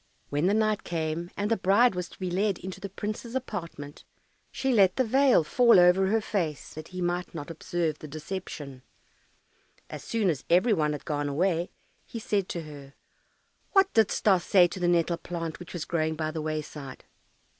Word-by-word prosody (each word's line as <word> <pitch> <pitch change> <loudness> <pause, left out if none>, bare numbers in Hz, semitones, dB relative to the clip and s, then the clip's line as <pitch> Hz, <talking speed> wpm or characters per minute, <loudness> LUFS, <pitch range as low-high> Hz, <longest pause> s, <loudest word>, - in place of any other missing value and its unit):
When 145 +5 +1
the 200 - +3
night 215 -1 +1
came, 165 0 -3
and 205 +2 -1
the - - +5
bride 200 +6 +4
was 180 -1 -4
to - - -15
be 185 -2 -4
led 195 +1 +1
into 190 +1 -8
the 200 - -5
prince's 215 +5 -5
apartment, 170 - -6 0.5
she 265 -1 0
let 195 -5 +4
her 260 - +4
veil 260 - +4
fall 235 +5 +5
over 180 +2 +5
her 220 +3 +2
face, 170 -9 -3
that 155 0 -8
he 185 0 -7
might 175 0 -2
not 155 0 -6
observe 165 -1 -2
the 155 - -8
deception. 150 -4 -7 1.1
As - - -7
soon 215 -6 +1
as 145 -4 -5
every 185 +7 +4
one 150 -5 +1
had 150 - -7
gone 145 -1 -2
away, 170 +3 0 0.3
he - - -8
said 205 -3 -1
to 170 - -4
her, 140 -3 -11 0.8
"What 390 -1 +4
didst 220 -3 +2
thou 195 -4 +5
say 180 +1 +5
to 185 - -7
the 175 - +1
nettle 170 0 +2
plant 165 -1 -5
which 175 - -10
was 170 -2 -4
growing 160 -1 -1
by 155 0 -2
the 160 -1 -4
wayside?" 150 -3 -6
175 Hz, 190 wpm, -27 LUFS, 155-205 Hz, 1.1 s, the